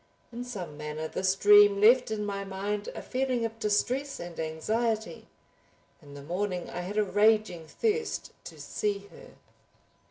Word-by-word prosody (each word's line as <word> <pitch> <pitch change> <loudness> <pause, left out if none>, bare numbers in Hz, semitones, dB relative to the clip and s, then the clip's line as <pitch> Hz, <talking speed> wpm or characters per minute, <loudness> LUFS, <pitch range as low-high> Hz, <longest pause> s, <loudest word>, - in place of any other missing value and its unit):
In 240 +1 -5
some 190 -11 -7
manner 150 +1 -5
this 190 +3 0
dream 205 0 +6
left 230 +5 +5
in 215 -1 -2
my 200 -1 -3
mind 200 +2 -4
a - - -6
feeling 255 -2 -1
of 225 0 -6
distress 255 +7 0
and 175 -1 -8
anxiety. 220 +8 -2 0.7
In 145 -2 -13
the 140 - -9
morning 180 +3 -3
I 180 - -4
had 195 +4 -5
a 215 - +4
raging 205 -4 +2
thirst 455 - -2
to - - -10
see 200 -1 -3
her. - - -14
205 Hz, 155 wpm, -28 LUFS, 180-225 Hz, 0.7 s, dream